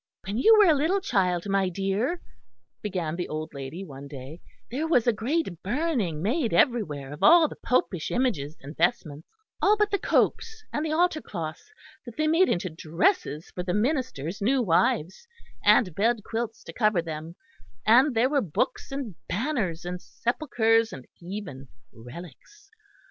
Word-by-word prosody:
"When 200 +4 -2
you 445 - +7
were 420 - +7
a 320 - +6
little 320 +7 +1
child, 185 - 0
my 195 -1 +1
dear," 195 - -1 0.6
began 180 -6 -3
the 175 0 -4
old 155 0 -5
lady 140 +7 -6
one 140 -3 -10
day, 140 +3 -9 0.3
"there 295 +6 -2
was 250 -8 +3
a 240 - +3
great 225 - -2
burning 230 - -1
made 235 - 0
everywhere 150 - +1
of 150 - -11
all 330 0 +7
the - - -9
popish 185 -9 0
images 170 - -1
and 145 +3 -9
vestments; 160 -3 -1 0.3
all 420 +1 +4
but 420 -1 +1
the 400 - +1
copes 445 -1 0
and 295 - -1
the 315 - -2
altar 325 -1 +2
cloths 165 - -7 0.4
that 235 - -9
they 310 - +1
made 330 +4 +4
into 175 +1 0
dresses 165 - -1
for 180 - -5
the 180 +1 -2
ministers' 215 - -1
new 260 +6 +2
wives, 170 - +1 0.4
and 185 -8 +4
bed 220 +4 +1
quilts 225 0 -4
to - - -10
cover 215 -7 +2
them; 160 +1 -7 0.5
and 250 +4 +5
there 230 +3 +4
were 280 0 +1
books 200 - -2
and 270 -7 -4 0.2
banners 200 - -2
and 180 0 -5
sepulchres 230 -3 +1
and 130 - -9
even 175 -7 -7 0.3
relics. 170 - -13
210 Hz, 165 wpm, -26 LUFS, 165-275 Hz, 0.6 s, you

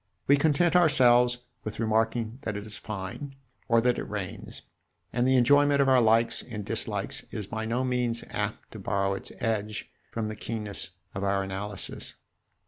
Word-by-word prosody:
We 140 - +6
content 160 +4 +3
ourselves 125 -7 +5 0.3
with 110 - -6
remarking 115 +1 0
that 110 -7 -3
it 105 - -6
is 110 0 -4
fine 105 +7 -6 0.3
or 115 - +5
that 125 +1 +2
it - - -5
rains, 100 -3 -5 0.5
and 125 +1 +2
the 130 - +4
enjoyment 145 +3 +5
of 140 - +4
our 130 -2 +6
likes 115 +1 +4
and 105 -4 -7
dislikes - - -1
is 105 - -4
by 110 +2 -4
no 120 +3 0
means 125 -2 0
apt - - -3
to - - -8
borrow 100 0 0
its 95 - -5
edge 110 -2 -2 0.2
from 115 -2 -3
the 110 - -5
keenness 105 -3 -3 0.2
of 95 - -4
our 100 0 +1
analysis. 95 +1 -4
115 Hz, 170 wpm, -28 LUFS, 105-125 Hz, 0.5 s, We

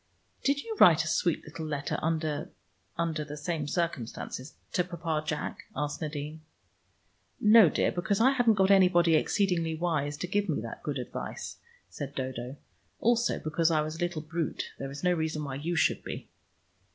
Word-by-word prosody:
"Did 280 +1 +1
you 445 - -5
write 165 -2 +7
a - - -5
sweet 170 +1 +1
little 155 +1 -6
letter 145 -2 -2
under 155 -2 -1 0.5
under 165 -2 -1
the 150 0 -7
same 150 -1 -2
circumstances 140 -4 -3 0.2
to 180 - +3
Papa 170 -3 -2
Jack?" 150 -1 -3
asked 145 +1 -2
Nadine. 150 0 -4 1.0
"No, 215 -4 +8
dear, - - +1
because 190 +3 0
I 255 +4 +6
hadn't 245 -5 +4
got 190 0 +4
anybody 180 -3 +5
exceedingly 165 -1 +2
wise 155 -4 -1
to 180 - -3
give 205 +1 0
me 150 - +1
that 115 0 -7
good 145 -2 -3
advice," 125 - -6 0.3
said 145 -1 -6
Dodo. 130 -1 -4 0.4
"Also, 235 +1 +2
because 160 +1 +1
I 155 -2 +3
was 155 +1 -4
a - - -12
little 175 -3 -2
brute 165 0 -3
there 135 - -4
is 140 +3 -8
no 180 0 +4
reason 160 -2 -1
why 140 -2 -4
you 155 +6 -2
should 160 - +2
be." - - -6
160 Hz, 175 wpm, -29 LUFS, 150-180 Hz, 1.0 s, No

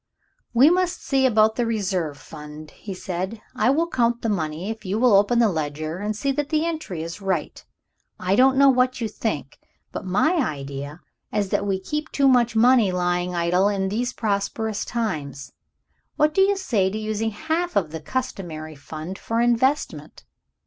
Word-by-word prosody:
"We 265 +7 +6
must 360 -1 0
see 270 -1 +2
about 220 -2 +3
the 240 - +1
Reserve 185 -9 -1
Fund," 150 +1 -11
he 205 - -9
said; 185 +4 -4 0.2
"I 255 - +2
will 320 +5 +2
count 240 -6 0
the 225 - 0
money, 170 0 -2
if 225 - -8
you 195 +1 -2
will 240 -1 +4
open 205 +4 +4
the 235 -1 +5
ledger 155 -1 -3
and 210 +1 -2
see 275 +6 -1
that 290 +1 -2
the 310 +1 +1
entry 310 - -4
is 170 +4 -7
right. 190 -6 -2 0.6
I 185 +2 +1
don't 265 +3 +5
know 275 0 +7
what 255 0 +1
you 230 - -1
think, 205 -10 -4 0.3
but - - -5
my 205 - +2
idea 145 - -4 0.3
is 205 -2 -1
that 205 - 0
we 190 -1 0
keep 300 +10 -4
too 275 -1 +3
much 240 -3 +3
money 235 -3 +5
lying 180 0 -1
idle 175 +3 +2
in 195 -2 -1
these 240 +5 -1
prosperous 215 0 -2
times. 150 - -4 0.6
What 300 0 +2
do 385 - +3
you 395 +1 +3
say 220 - +1
to 205 - -4
using 215 +1 -2
half 320 +9 -2
of 170 -7 +1
the 160 -1 -6
customary 160 -7 -4
fund 155 +5 -8
for 230 0 -2
investment? 240 +4 0
210 Hz, 180 wpm, -23 LUFS, 175-255 Hz, 0.6 s, know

